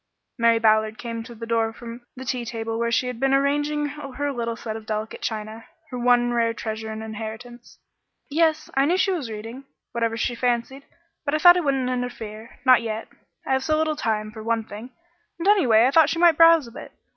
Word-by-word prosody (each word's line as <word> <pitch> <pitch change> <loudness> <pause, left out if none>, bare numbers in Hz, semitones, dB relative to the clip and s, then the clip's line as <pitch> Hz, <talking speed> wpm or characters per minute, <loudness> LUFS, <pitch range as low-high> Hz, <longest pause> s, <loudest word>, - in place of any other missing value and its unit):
Mary 230 0 +4
Ballard 220 0 +2
came 230 -1 -5
to 235 +1 -11
the 230 +1 -7
door 230 -1 0
from 235 +1 -10
the 260 0 -8
tea 245 0 -2
table 225 -1 -4
where 235 0 0
she 245 - +1
had 250 -2 -5
been 270 +1 +2
arranging 290 +2 +1
her 285 -1 -4
little 235 -2 -3
set 220 -2 -6
of 220 -1 -9
delicate 215 0 -4
china, 220 0 -5 0.3
her 250 - -4
one 240 0 +3
rare 230 -1 +1
treasure 220 0 -5
and 220 0 -6
inheritance. 225 +2 -8 0.5
"Yes, 315 +1 +1
I 270 +1 +3
knew 350 +5 +2
she 385 - +2
was 310 -10 -3
reading 225 +5 -8 0.3
whatever 230 -1 -1
she 240 - -1
fancied, 245 +3 -2 0.4
but 290 0 -1
I - - +3
thought 350 +3 +8
I - - +2
wouldn't 275 -5 0
interfere 230 -3 -5
not 255 -3 +6
yet. 220 -1 -5 0.4
I - - 0
have 265 0 +1
so 310 +1 +1
little 310 0 0
time, 215 -6 -2
for 220 0 -9
one 230 0 -1
thing, 220 +3 -9 0.5
and, 340 +3 -3
anyway, 250 - +5
I 260 - +3
thought 315 0 +5
she 330 - -2
might 345 0 +6
browse 330 -2 +6
a 235 - -12
bit. - - -10
240 Hz, 215 wpm, -23 LUFS, 225-275 Hz, 0.5 s, thought